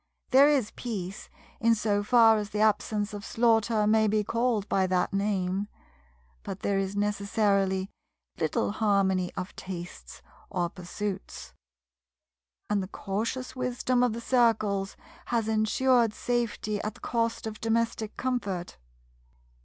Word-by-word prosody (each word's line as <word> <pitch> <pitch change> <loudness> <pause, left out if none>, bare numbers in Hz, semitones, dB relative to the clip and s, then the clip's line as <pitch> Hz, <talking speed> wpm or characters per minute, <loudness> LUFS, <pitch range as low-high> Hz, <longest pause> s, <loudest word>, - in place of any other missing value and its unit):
There 275 +2 +7
is 265 -8 +1
peace, 195 -5 -6 0.3
in 230 0 +4
so 210 -1 0
far 225 0 +5
as 205 -1 -3
the 210 - -3
absence 215 -1 +1
of 205 -1 -6
slaughter 225 -1 +2
may 220 +1 +4
be 210 0 +2
called 230 -1 0
by 190 -1 +2
that 180 +1 0
name, 195 -1 0 0.7
but 190 - -7
there 200 -1 +1
is 195 +1 -2
necessarily 200 -1 +1 0.5
little - - 0
harmony 195 -4 +1
of 185 0 -5
tastes 70 - -8 0.3
or 175 -1 -1
pursuits; 190 +2 -6 1.1
and 205 -1 +1
the 185 - -5
cautious 220 +7 -4
wisdom 250 0 0
of 250 -3 +2
the 235 - -5
Circles 215 -6 +1 0.3
has 230 -2 0
ensured 225 +1 +2
safety 230 -3 -1
at 215 - -4
the - - -17
cost 230 -1 -1
of 215 -1 -6
domestic 225 -1 -1
comfort. 200 - -3
210 Hz, 130 wpm, -28 LUFS, 195-230 Hz, 1.1 s, There